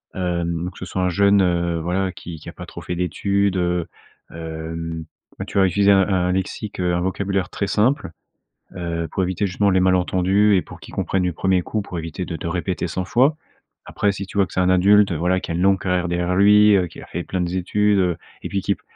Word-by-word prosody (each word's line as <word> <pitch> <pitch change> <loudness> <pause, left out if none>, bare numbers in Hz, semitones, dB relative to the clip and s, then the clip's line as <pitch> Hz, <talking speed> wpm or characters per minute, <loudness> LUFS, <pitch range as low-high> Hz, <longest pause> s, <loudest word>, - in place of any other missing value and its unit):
Hem, 85 -2 -2
ou 90 - -5
que - - -15
ce 95 - -5
soit 95 - -3
un 90 - +2
jeune, 100 +2 +4
heu, 85 -2 0
voilà, 90 +3 -1
qui 85 -2 -9
qui - - -10
a - - -10
pas - - -9
trop - - -10
fait 90 - -4
d'études, 100 +2 0
heu, 90 -1 0 0.5
hem, 80 0 -6 0.3
bah, - - -5
tu 100 - -1
vas 95 - +5
utiliser 100 +3 +3
un 95 - +6
un 90 -2 +1
lexique, 95 +2 -3
heu, 90 -1 +1
un 90 - 0
vocabulaire 95 +1 -1
très 100 - -3
simple, 110 - +1 0.7
heu, 85 -2 -3
pour 95 - 0
éviter 95 +3 -1
justement 100 +3 +1
les 95 -1 +3
malentendus 95 +2 +3
et - - +2
pour - - -12
qu'il - - -12
comprenne 95 -1 -1
du 90 - 0
1er 95 +1 +1
coup, 105 +4 -3
pour 90 -3 -7
éviter 80 +3 -5
de 85 - -5
te 85 - -5
répéter 90 +1 -2
100 90 +2 -3
fois. 135 - +3 0.5
Après, 100 - 0
si 100 0 -5
tu 95 - -9
vois 100 - +4
que - - -14
c'est 95 - +1
un 90 - +2
adulte, 100 +2 +5
voilà, 90 +3 0
qui - - -5
a - - -1
une 85 - -1
longue 95 0 +4
carrière 90 -1 0
derrière 90 +1 -1
lui, 105 +1 +6
heu, 90 -2 0
qui 85 - -12
a - - -10
fait 85 - -5
plein 95 - -3
de 90 - -1
z 95 - -2
études, 105 +3 +1
heu, 90 -3 +1 0.2
et - - -5
puis 100 - -1
qui 100 - 0
p - - -29
90 Hz, 250 wpm, -21 LUFS, 85-100 Hz, 0.7 s, un